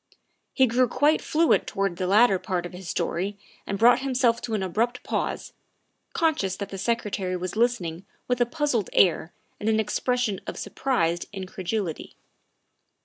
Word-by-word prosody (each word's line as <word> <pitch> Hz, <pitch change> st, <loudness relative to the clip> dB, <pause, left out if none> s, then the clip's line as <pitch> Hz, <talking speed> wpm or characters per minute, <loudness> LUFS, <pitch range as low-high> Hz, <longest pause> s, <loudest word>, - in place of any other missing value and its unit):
He 265 Hz, -, +5 dB
grew 250 Hz, +1 st, +2 dB
quite 295 Hz, +6 st, +2 dB
fluent 320 Hz, +1 st, +2 dB
towards 195 Hz, -3 st, -2 dB
the 185 Hz, -, -1 dB
latter 200 Hz, 0 st, +5 dB
part 180 Hz, -3 st, -2 dB
of 175 Hz, -, -8 dB
his 180 Hz, -1 st, -8 dB
story 185 Hz, +3 st, -2 dB, 0.3 s
and 200 Hz, -, -2 dB
brought 235 Hz, +4 st, +6 dB
himself 255 Hz, -3 st, +1 dB
to 225 Hz, -3 st, -3 dB
an 200 Hz, -, -1 dB
abrupt 230 Hz, +7 st, -1 dB
pause, -, -, -3 dB, 0.6 s
conscious 300 Hz, -, +1 dB
that 200 Hz, -1 st, -6 dB
the 195 Hz, -, -7 dB
Secretary 200 Hz, -4 st, -1 dB
was 185 Hz, +2 st, -5 dB
listening 195 Hz, -7 st, 0 dB, 0.2 s
with 250 Hz, 0 st, 0 dB
a 240 Hz, -, +4 dB
puzzled 255 Hz, -, -1 dB
air 170 Hz, -2 st, +3 dB, 0.3 s
and 215 Hz, -, -1 dB
an 220 Hz, 0 st, +2 dB
expression 220 Hz, -1 st, 0 dB
of -, -, -5 dB
surprised 175 Hz, -11 st, -1 dB
incredulity. 190 Hz, -2 st, -4 dB
210 Hz, 155 wpm, -25 LUFS, 185-245 Hz, 0.6 s, brought